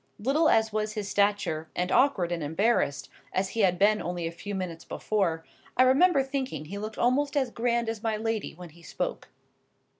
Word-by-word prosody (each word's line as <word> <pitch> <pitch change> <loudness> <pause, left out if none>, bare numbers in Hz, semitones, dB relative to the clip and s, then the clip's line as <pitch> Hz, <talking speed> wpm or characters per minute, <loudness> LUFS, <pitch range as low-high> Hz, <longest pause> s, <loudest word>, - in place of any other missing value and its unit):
Little 280 +9 +2
as 220 -1 +3
was 215 0 -1
his 210 -2 -4
stature, 200 -6 0
and 180 +1 -1
awkward 205 -11 +3
and 170 -1 -2
embarrassed 155 - 0 0.2
as 190 +1 0
he 230 - -5
had 185 -4 +3
been 210 +3 +3
only 175 -1 -3
a 165 - -2
few 200 +4 -6
minutes 175 -3 -5
before, 175 -6 -1 0.3
I 255 - +7
remember 275 +3 +4
thinking 265 - -4
he 200 +6 -6
looked 215 +1 -6
almost 280 +4 +1
as 260 -4 +1
grand 235 0 0
as 225 -2 -3
my 220 -1 -1
lady 225 -3 -3
when 175 0 -10
he 170 +2 -18
spoke. - - -4
210 Hz, 190 wpm, -27 LUFS, 175-235 Hz, 0.3 s, I